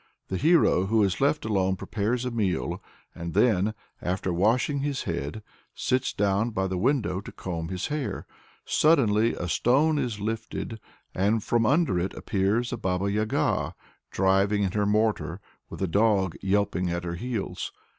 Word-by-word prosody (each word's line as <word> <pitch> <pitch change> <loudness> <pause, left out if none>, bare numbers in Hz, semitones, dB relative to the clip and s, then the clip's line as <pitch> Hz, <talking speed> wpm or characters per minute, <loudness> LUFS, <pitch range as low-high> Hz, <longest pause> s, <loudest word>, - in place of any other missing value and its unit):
The 95 - -1
hero 150 - +4
who 110 +1 +3
is 95 +2 0
left 145 0 +2
alone 95 -3 +1
prepares 110 +6 -2
a 125 - -2
meal, 100 -7 -1 0.3
and 85 -1 -6
then, 110 -2 +3 0.3
"after 90 0 -1
washing 115 - +2
his 140 -1 -2
head, 85 +3 -4 0.3
sits 130 0 0
down 100 +3 +1
by 95 -4 -1
the 95 -1 -2
window 105 -6 +1
to - - -9
comb 85 -3 -5
his 95 0 -3
hair." 150 -3 -3 0.4
Suddenly 115 -8 +3
a 85 - -4
stone 140 - +2
is 115 -6 -2
lifted, 110 +1 -4 0.3
and 105 +3 +1
from 115 -2 +2
under 145 - +2
it 90 +2 -3
appears 105 +6 0
a - - -2
Baba 95 -1 -1
Yaga, 105 +1 0 0.3
driving 100 +2 +2
in 95 - 0
her 105 +1 0
mortar, 105 -5 +1 0.3
with - - -5
a - - +1
dog 100 -1 +2
yelping 95 -2 +1
at 85 0 -2
her 85 -1 -3
heels. 110 +3 -4
105 Hz, 160 wpm, -26 LUFS, 95-120 Hz, 0.4 s, hero